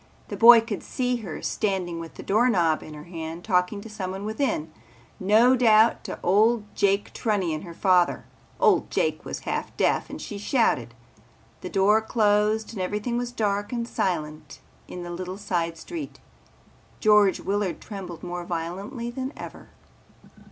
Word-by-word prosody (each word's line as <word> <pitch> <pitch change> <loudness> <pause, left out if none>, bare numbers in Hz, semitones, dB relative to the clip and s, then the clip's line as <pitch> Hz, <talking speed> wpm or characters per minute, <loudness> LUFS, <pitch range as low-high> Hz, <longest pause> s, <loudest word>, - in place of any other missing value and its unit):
The - - -4
boy 235 0 +9
could 225 -4 -5
see 250 -1 -1
her 200 -9 -7
standing 185 -5 -1
with 165 -1 -9
the - - -9
doorknob 195 -7 +2
in 155 - -10
her 150 - -9
hand 165 0 -7
talking 185 0 +1
to 225 - -10
someone 195 -2 -5
within, 215 - -2 0.5
no 220 +7 +5
doubt 225 -2 +4
to - - -5
old 215 +4 +3
Jake 200 0 +1
Trunnion, 185 -9 -1
her 170 -3 -10
father. 180 -2 +2 0.3
Old - - +3
Jake - - -1
was - - -6
half - - -4
deaf - - +1
and - - -7
she 205 - -7
shouted. 200 - +1 0.7
The 180 - -6
door 205 +3 +3
closed 215 0 +1
and 200 - -4
everything 210 +5 -2
was 245 0 -2
dark 205 -3 -1
and 235 -1 -2
silent 155 -8 -3 0.3
in 180 - -7
the 175 - -6
little 185 +2 -5
side 170 -5 -2
street. 315 - -7 0.8
George 210 -3 +4
Willard 200 -3 -2
trembled 190 -5 -8
more 175 0 -5
violently 185 - -5
than 260 +2 -4
ever. - - -10
200 Hz, 155 wpm, -25 LUFS, 175-220 Hz, 0.8 s, boy